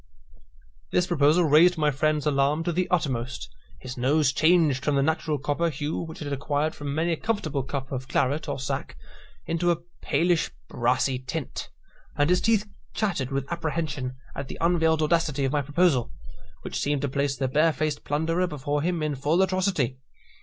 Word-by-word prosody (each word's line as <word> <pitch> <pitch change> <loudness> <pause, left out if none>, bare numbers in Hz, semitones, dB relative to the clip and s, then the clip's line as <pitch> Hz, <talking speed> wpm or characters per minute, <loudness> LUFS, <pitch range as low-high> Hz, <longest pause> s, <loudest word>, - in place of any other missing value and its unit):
This 180 - +2
proposal 165 -1 +3
raised 165 +3 +5
my 150 -1 +2
friend's 150 +2 0
alarm 145 +2 +2
to 175 - 0
the 180 +2 -1
uttermost. 130 -7 -1 0.3
His 130 0 -8
nose 135 +3 +3
changed 155 -4 +3
from 145 0 +1
the 140 - +3
natural 155 0 0
copper 150 +4 0
hue 145 +1 -3
which 160 -1 -7
it - - -2
had 145 -1 -3
acquired 145 +3 -1
from 145 -1 -5
many 165 +2 +1
a - - +2
comfortable 205 -11 -1
cup 135 0 -5
of 130 -1 -4
claret 140 +4 0
or - - -2
sack, 135 - -4 0.5
into 170 +1 0
a 170 - +3 0.2
palish 175 -1 +1 0.2
brassy 125 +2 +1
tint, 130 +3 -5 0.5
and 145 +4 +3
his 180 - +3
teeth 220 -2 +2 0.3
chattered 175 - -1
with 135 0 -2
apprehension 155 -6 -2 0.2
at 140 - -5
the - - -7
unveiled 160 -2 +2
audacity 155 -3 +1
of 135 - 0
my 145 0 +1
proposal, 145 -3 +2 0.5
which - - -4
seemed 145 -1 0
to - - +1
place 140 +1 0
the 135 0 0
barefaced 155 +1 +1
plunderer 165 +5 0
before 145 -2 -2
him 170 0 -1
in 150 -1 0
full 145 +6 +1
atrocity. 185 -9 0
150 Hz, 175 wpm, -26 LUFS, 140-165 Hz, 0.5 s, raised